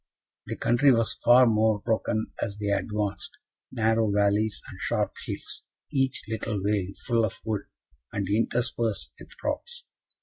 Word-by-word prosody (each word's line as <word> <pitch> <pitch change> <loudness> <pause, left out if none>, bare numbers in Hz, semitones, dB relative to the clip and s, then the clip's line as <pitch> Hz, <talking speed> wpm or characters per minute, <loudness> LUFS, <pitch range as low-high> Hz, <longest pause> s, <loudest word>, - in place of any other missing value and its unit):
The - - -3
country 130 +4 +4
was 115 -2 +3
far 125 +2 +8
more 110 -2 +3
broken 110 0 -1
as 100 -2 -2
they 105 -1 -2
advanced 105 0 -2 0.3
narrow 110 -1 +2
valleys 105 +1 +2
and - - -10
sharp - - 0
hills, - - -5 0.3
each 135 -2 +1
little 110 -1 -2
vale 100 -1 0
full 115 -1 +2
of 110 - -1
wood, 105 -3 -2 0.4
and 100 -2 -2
interspersed 115 +1 0
with - - -12
rocks. 480 0 -3
110 Hz, 140 wpm, -27 LUFS, 105-115 Hz, 0.4 s, far